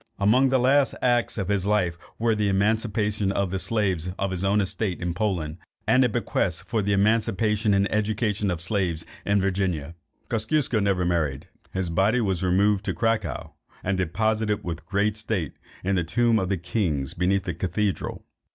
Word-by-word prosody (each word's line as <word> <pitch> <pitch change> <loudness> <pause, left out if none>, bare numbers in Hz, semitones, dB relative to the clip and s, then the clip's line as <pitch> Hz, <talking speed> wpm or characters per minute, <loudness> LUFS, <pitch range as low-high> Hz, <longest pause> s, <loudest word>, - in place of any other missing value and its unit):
Among 125 +7 +4
the 130 - +3
last 135 +2 +3
acts 120 -2 +2
of 100 -4 -2
his 100 -1 0
life, 90 -5 +1 0.2
were 115 0 +2
the 105 -1 +1
emancipation 105 0 +1
of 100 -2 -1
the 95 - -1
slaves 95 -6 0
on 100 -1 -1
his 95 0 -3
own 100 +2 +3
estate 95 -1 -1
in 85 -1 -2
Poland, 90 -5 -2 0.3
and 130 +1 +4
a 125 - +3
bequest 95 -6 -1
for 115 -3 -1
the 100 +1 -1
emancipation 105 0 +2
and 100 0 +3
education 105 -1 0
of 85 -3 -2
slaves 85 -3 0 0.2
in 100 0 +3
Virginia. 90 -6 -1 0.3
Kosciusko 120 +3 +1
was 105 - +1
never 95 -3 +1
married. 85 -2 -1 0.2
His 95 -2 -2
body 100 +8 +2
was 95 -6 0
removed 95 +2 +2
to - - -2
Cracow, 115 -1 -1 0.3
and 95 +1 0
deposited 105 +4 0
with 85 -1 -6
great 105 +1 +1
state 110 -8 -2 0.3
in 95 +2 0
the 90 -2 +1
tomb 115 +5 +2
of 95 - -2
the 100 - +1
kings 85 -7 -1
beneath 95 +2 +1
the - - -3
cathedral. 95 +2 -2
100 Hz, 180 wpm, -25 LUFS, 90-110 Hz, 0.3 s, Among